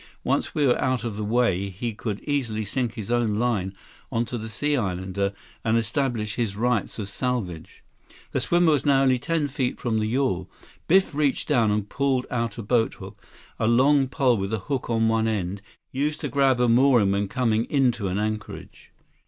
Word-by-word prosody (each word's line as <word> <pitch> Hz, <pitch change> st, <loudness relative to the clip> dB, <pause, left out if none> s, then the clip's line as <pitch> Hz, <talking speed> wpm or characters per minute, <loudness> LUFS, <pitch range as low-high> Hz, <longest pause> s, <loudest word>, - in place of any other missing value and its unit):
Once -, -, -1 dB
we 145 Hz, -, +2 dB
were 125 Hz, -, +2 dB
out 130 Hz, -2 st, 0 dB
of 115 Hz, -3 st, -3 dB
the 105 Hz, -, -4 dB
way, 105 Hz, -4 st, +1 dB
he 110 Hz, +5 st, -4 dB
could 105 Hz, -1 st, -4 dB
easily 120 Hz, -7 st, -2 dB
sink 120 Hz, +2 st, -2 dB
his 110 Hz, 0 st, -5 dB
own 120 Hz, -3 st, +1 dB
line 110 Hz, -5 st, 0 dB, 0.4 s
onto 115 Hz, +1 st, -1 dB
the 110 Hz, -1 st, -5 dB
Sea 145 Hz, +7 st, 0 dB
Islander 95 Hz, -3 st, -1 dB, 0.3 s
and 110 Hz, +1 st, +2 dB
establish 115 Hz, -3 st, -1 dB
his 115 Hz, -5 st, -2 dB
rights 120 Hz, -1 st, 0 dB
of 105 Hz, -3 st, -4 dB
salvage." 100 Hz, -7 st, -4 dB, 0.5 s
The -, -, 0 dB
swimmer 175 Hz, -1 st, +3 dB
was 145 Hz, -, +2 dB
now 135 Hz, -2 st, +4 dB
only 130 Hz, -2 st, +3 dB
ten 165 Hz, +2 st, 0 dB
feet 130 Hz, -2 st, -2 dB
from 115 Hz, -3 st, 0 dB
the 110 Hz, -, 0 dB
yawl. 110 Hz, -7 st, 0 dB, 0.4 s
Biff 190 Hz, 0 st, +4 dB
reached 145 Hz, -2 st, 0 dB
down 120 Hz, -7 st, +3 dB
and 105 Hz, -1 st, 0 dB
pulled 135 Hz, +1 st, 0 dB
out 115 Hz, -3 st, -2 dB
a 115 Hz, -, -5 dB
boathook, 115 Hz, +1 st, -1 dB, 0.4 s
a 110 Hz, -, +1 dB
long 135 Hz, +4 st, +4 dB
pole 130 Hz, -3 st, +2 dB
with 95 Hz, +1 st, -3 dB
a -, -, +1 dB
hook 135 Hz, -4 st, -2 dB
on 115 Hz, -1 st, +2 dB
one 110 Hz, 0 st, +2 dB
end, 100 Hz, -3 st, -2 dB, 0.3 s
used 145 Hz, +3 st, -1 dB
to -, -, -2 dB
grab 135 Hz, -3 st, +3 dB
a 125 Hz, -, +3 dB
mooring 120 Hz, -4 st, +4 dB
when 100 Hz, 0 st, 0 dB
coming 115 Hz, 0 st, +1 dB
into 125 Hz, -7 st, +1 dB
an 95 Hz, +1 st, -2 dB
anchorage. 105 Hz, 0 st, -5 dB
115 Hz, 190 wpm, -25 LUFS, 105-130 Hz, 0.5 s, now